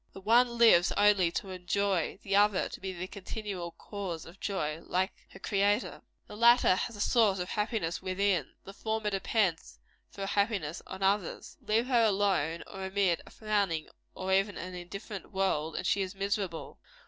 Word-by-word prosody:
The - - -9
one 235 +4 +3
lives 220 -7 +6
only 205 -4 +4
to 195 - -3
enjoy; 185 0 -1
the 195 0 0
other, 205 -1 +4
to - - -9
be 190 0 -4
the 180 0 -5
continual 195 -2 -6
cause 180 -2 -6
of 175 +3 -14
joy, 160 -6 -2
like 185 +2 -1 0.2
her - - -13
Creator. 205 +3 0 0.2
The - - -11
latter 235 -2 +6
has 225 +5 -3
a - - -10
source 215 -3 +3
of 180 -1 -4
happiness 210 -6 -2
within; 185 -4 0
the 195 - -10
former 220 0 -2
depends 190 - 0 0.3
for 200 - -10
her - - -1
happiness 200 -6 0
on 190 +1 -6
others. 195 -2 0
Leave 225 +3 +1
her 250 -2 +3
alone, 190 -6 +1
or 195 -1 -8
amid 190 -3 +1
a - - -11
frowning 200 -7 -1 0.3
or 190 0 -2
even 195 +1 +2
an 185 +1 -6
indifferent 190 +2 -8
world, 165 -5 0
and - - -3
she 200 - +2
is 190 0 -4
miserable. 195 -4 -3
195 Hz, 175 wpm, -30 LUFS, 180-210 Hz, 0.3 s, lives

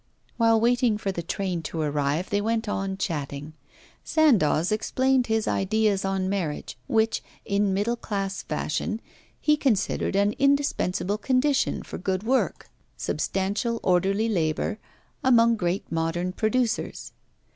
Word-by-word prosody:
While 225 -1 +4
waiting 240 -1 +2
for 200 -2 -2
the 175 - -4
train 180 0 -2
to 160 0 -5
arrive, 150 +2 -1
they 205 0 +2
went 225 +1 -1
on 195 -1 -2
chatting. 150 -6 -4 0.5
Sandoz 210 - +3
explained 255 +4 +1
his 220 -1 0
ideas 205 0 +1
on 195 -1 -1
marriage, 185 -7 -3
which, 225 0 +1 0.2
in 200 0 +1
middle 205 +5 0
class 195 -4 -3
fashion, 155 +7 -2 0.4
he 300 - +3
considered 220 -9 0
an 200 +1 +3
indispensable 275 -8 +1
condition 265 +4 +1
for - - -7
good 190 +1 -1
work, 255 +3 0 0.3
substantial 205 +5 -1
orderly 195 +4 +2
labour, 185 +2 -1 0.4
among 235 -3 +5
great 180 -2 -2
modern 165 +2 -1
producers. 230 +3 -1
205 Hz, 125 wpm, -26 LUFS, 185-230 Hz, 0.5 s, among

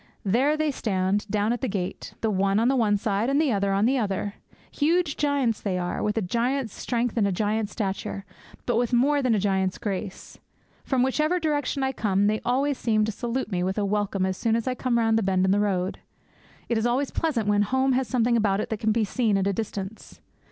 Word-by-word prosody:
There 260 +10 +2
they 310 -1 +1
stand, 200 -3 -1
down 210 +2 +1
at 240 - -4
the 260 - 0
gate; 190 -4 -4
the 220 - +1
one 195 0 +1
on 235 +2 +3
the 270 - +2
one 215 -5 +2
side, 205 +3 0
and 280 +1 +2
the 305 -4 +2
other 200 -2 +1
on 195 +2 +2
the 260 +2 +2
other. 200 -1 -2 0.4
Huge 320 +1 +1
giants 275 -6 0
they 190 -3 -1
are, 180 0 -2
with 210 +1 -1
a 220 - +1
giant's 240 +4 -1
strength 240 -1 -2
and 205 -3 +3
a - - 0
giant's 210 +2 -1
stature, 195 -1 -3 0.4
but 240 -2 +1
with 245 +1 0
more 280 +4 +3
than 250 -4 +2
a - - +1
giant's 190 -1 0
grace. 200 -4 -5 0.4
From 260 -2 +1
whichever 305 +7 +1
direction 290 -3 -1
I 265 - +1
come, 200 -5 +1
they 215 +1 +1
always 270 +3 0
seem 215 -2 +2
to 220 - -2
salute 240 +2 -3
me 180 -2 0
with 190 +2 -1
a 205 - +1
welcome 200 -1 0
as 190 0 -2
soon 225 -1 +1
as 230 +1 -2
I 255 - +1
come 250 -1 0
round 225 -1 +3
the - - -1
bend 190 -2 +1
in 190 - +2
the 200 - +3
road. 190 -2 -1 0.7
It 235 -2 +1
is 225 - +1
always 255 +3 0
pleasant 270 -10 -1
when 205 0 +3
home 260 +5 +1
has 260 -1 +1
something 240 -2 +2
about 205 -3 +2
it - - -3
that 220 - -2
can 220 0 +1
be 225 +1 +1
seen 215 -1 +1
at 195 - 0
a 200 - +1
distance. 205 0 -6
220 Hz, 235 wpm, -25 LUFS, 200-255 Hz, 0.7 s, on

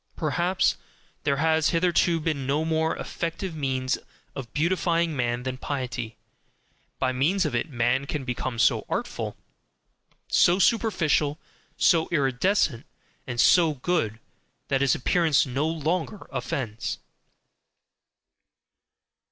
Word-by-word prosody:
Perhaps 175 +4 +1 0.5
there 140 -1 +2
has 160 +1 +2
hitherto 170 0 +2
been 150 -4 -2
no 150 +3 +1
more 160 0 0
effective 170 +1 -4
means 130 -3 -1 0.4
of 125 -4 -7
beautifying 170 +1 +1
man 120 -1 -1
than 130 0 -3
piety, 125 -5 -4 0.8
by 130 -1 +1
means 165 +9 +1
of 150 - -2
it 120 +7 -1
man 125 +1 0
can 145 -2 -3
become 125 -1 -3
so - - +3
artful, - - -3 0.9
so 175 +1 +4
superficial, 170 -7 +2 0.4
so 165 -2 +3
iridescent, 140 - +1 0.4
and 120 -1 -4
so 165 0 +5
good, 125 -7 -1 0.5
that 135 -1 +1
his 140 -2 +3
appearance 160 +2 +2
no 135 +4 -1
longer 165 +5 -2
offends. 125 -3 -3
150 Hz, 110 wpm, -26 LUFS, 130-170 Hz, 0.9 s, so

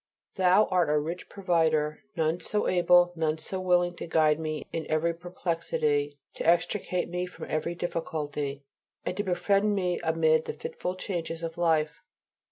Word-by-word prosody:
Thou 185 +3 +4
art 180 -4 +3
a 150 - +3
rich 165 +4 -4
provider. 160 -5 +1 0.2
None 160 0 +1
so 210 +3 -1
able, 175 0 +4
none 160 -1 0
so 185 +4 -4
willing 175 -1 +2
to - - -6
guide 155 -2 +3
me 155 -1 -3
in 165 -1 -3
every 160 +2 +1
perplexity, 165 -4 -1 0.2
to - - -5
extricate 175 +2 +1
me 180 +1 -3
from 180 - -9
every 170 +2 -2
difficulty, 150 -5 -3 0.4
and - - -2
to 205 - 0
befriend 200 +3 +2
me 180 -3 0
amid 160 -1 +2
the - - -4
fitful 180 - -5
changes 170 -4 -4
of 165 -1 -4
life. 160 -1 +1
170 Hz, 160 wpm, -28 LUFS, 155-180 Hz, 0.4 s, Thou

